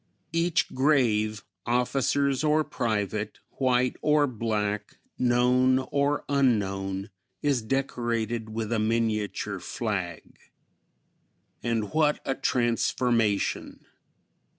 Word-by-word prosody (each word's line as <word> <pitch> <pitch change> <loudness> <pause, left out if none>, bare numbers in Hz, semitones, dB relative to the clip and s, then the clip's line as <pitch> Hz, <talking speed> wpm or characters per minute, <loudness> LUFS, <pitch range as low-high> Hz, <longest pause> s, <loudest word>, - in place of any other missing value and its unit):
Each 165 0 +1
grave, 115 -7 +2 0.2
officers 135 +3 +1
or 155 0 +3
private, 105 -5 -2 0.2
white 125 -1 +2
or 150 -1 +4
black, 105 -4 -2 0.2
known 125 +1 +3
or 140 +2 0
unknown, 100 -7 0 0.3
is 140 -5 +2
decorated 120 -2 -2
with 110 0 -4
a 115 - +1
miniature 105 -3 -1
flag. 95 -4 -4 1.2
And 115 -3 -1
what 155 -1 +3
a 135 - +1
transformation! 120 -4 0
120 Hz, 85 wpm, -27 LUFS, 105-135 Hz, 1.2 s, or